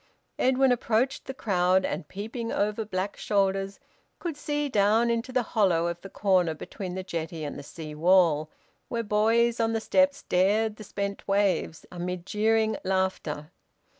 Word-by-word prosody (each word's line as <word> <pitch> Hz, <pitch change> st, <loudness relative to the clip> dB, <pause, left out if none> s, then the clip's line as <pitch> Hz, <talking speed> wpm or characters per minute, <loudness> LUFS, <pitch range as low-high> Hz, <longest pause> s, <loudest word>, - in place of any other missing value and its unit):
Edwin 260 Hz, 0 st, +4 dB
approached 245 Hz, +2 st, 0 dB
the 265 Hz, -, -5 dB
crowd, 185 Hz, -4 st, +2 dB
and, 150 Hz, -, -3 dB
peeping 225 Hz, +4 st, -5 dB
over 210 Hz, +2 st, 0 dB
black 195 Hz, 0 st, -3 dB
shoulders, 195 Hz, -1 st, 0 dB, 0.4 s
could 340 Hz, -4 st, -4 dB
see 295 Hz, 0 st, -2 dB
down 220 Hz, 0 st, +3 dB
into 235 Hz, +2 st, -2 dB
the 250 Hz, -1 st, +1 dB
hollow 180 Hz, -6 st, +3 dB
of 170 Hz, 0 st, -3 dB
the 195 Hz, -, -9 dB
corner 185 Hz, -6 st, +2 dB
between 185 Hz, +3 st, -7 dB
the 190 Hz, -, -4 dB
jetty 165 Hz, -2 st, -4 dB
and 145 Hz, -, -4 dB
the -, -, -7 dB
sea 155 Hz, +1 st, -9 dB
wall, 160 Hz, -2 st, +3 dB, 0.4 s
where 235 Hz, -1 st, -2 dB
boys 225 Hz, +3 st, +2 dB
on 225 Hz, 0 st, +1 dB
the 225 Hz, -, +1 dB
steps 280 Hz, +4 st, +2 dB
dared 210 Hz, +4 st, +2 dB
the 215 Hz, -, -9 dB
spent 200 Hz, 0 st, -4 dB
waves, 195 Hz, -5 st, +1 dB
amid 180 Hz, 0 st, -4 dB
jeering 220 Hz, +1 st, +1 dB
laughter. 185 Hz, -5 st, -1 dB
200 Hz, 160 wpm, -27 LUFS, 180-225 Hz, 0.4 s, Edwin